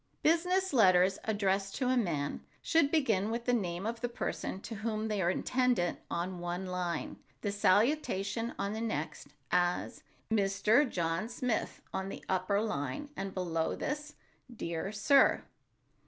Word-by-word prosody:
Business 360 +3 +2
letters 190 -5 +5
addressed 195 -2 0
to 255 - 0
a 255 - +3
man 165 - -1 0.2
should 325 -4 +3
begin 225 - +2
with 235 +1 -3
the 245 - +2
name 185 -4 -1
of 230 +1 -3
the 245 - -1
person 215 -4 -3
to 230 - -7
whom 215 0 -2
they 210 -2 0
are 175 - +2
intended 245 -2 +1
on 175 +1 -3
one 175 +2 -3
line, 180 -3 -3 0.2
the 205 - -1
salutation 215 +1 +1
on 200 +1 -2
the 220 - -3
next, 155 -9 -3 0.2
as: 180 0 +1 0.3
"Mr. 215 +6 +3
John 170 +4 -1
Smith" 245 -1 -2
on 190 0 -2
the - - -8
upper 190 +2 +1
line, 145 - -3
and 195 -3 -4
below 165 -4 -1
this, 295 0 -4 0.4
"Dear 170 -4 -4
Sir." 260 +6 +4
200 Hz, 150 wpm, -32 LUFS, 180-235 Hz, 0.4 s, letters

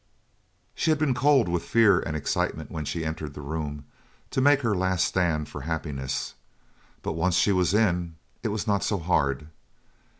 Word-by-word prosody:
She - - -1
had 155 - +4
been 150 -3 +1
cold 135 -4 +4
with 85 -1 0
fear 100 +1 +4
and 75 0 -3
excitement 75 - -2
when 80 -1 -4
she 80 +2 -3
entered 80 -2 -5
the - - -7
room 75 -1 -5 0.5
to 130 - 0
make 145 +1 +5
her 110 -5 +1
last 95 -1 +1
stand 80 -5 0
for 75 - -8
happiness, 75 -3 -3 0.7
but - - -2
once 85 +2 +1
she 100 - +3
was 90 0 +2
in, 90 -6 +1 0.3
it - - -2
was 105 0 -2
not 100 -3 +1
so 105 - 0
hard. 75 -5 0
85 Hz, 175 wpm, -26 LUFS, 80-105 Hz, 0.7 s, make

